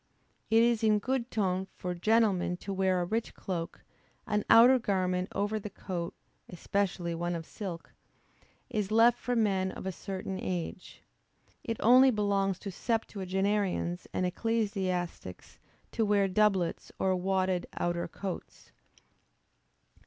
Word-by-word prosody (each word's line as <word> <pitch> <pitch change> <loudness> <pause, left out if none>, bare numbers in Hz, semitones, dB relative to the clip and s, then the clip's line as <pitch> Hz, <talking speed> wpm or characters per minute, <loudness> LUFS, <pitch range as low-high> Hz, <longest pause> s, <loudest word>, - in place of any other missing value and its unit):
It 225 +1 +5
is 235 -1 +2
in 215 -1 +4
good 250 +3 -2
ton 190 -3 -1
for 180 0 -4
gentlemen 195 -2 +2
to 195 +2 -5
wear 190 -1 +1
a - - -1
rich 225 +5 -2
cloak; 170 -3 -5 0.4
an 210 -2 0
outer 250 +3 +8
garment 185 -4 0
over 205 +2 -1
the 210 - -6
coat 180 -3 -5 0.3
(especially 180 -1 -2
one 175 +1 -2
of 165 -1 -5
silk,) 180 -5 -7 0.7
is 210 -3 -2
left 230 +2 +5
for 245 - -2
men 195 -4 +1
of - - -8
a 190 - -1
certain 190 0 -5
age. 180 0 -5 0.6
It 230 -2 -3
only 255 +3 +7
belongs 200 -4 +1
to 200 - -5
septuagenarians 195 -3 -1
and 185 - -1
ecclesiastics 185 - -2 0.3
to 225 - 0
wear 205 -2 +3
doublets 190 -3 +1
or 190 -1 +1
wadded 185 -1 0
outer 175 0 -1
coats. 185 +2 -7
195 Hz, 130 wpm, -30 LUFS, 180-215 Hz, 0.7 s, outer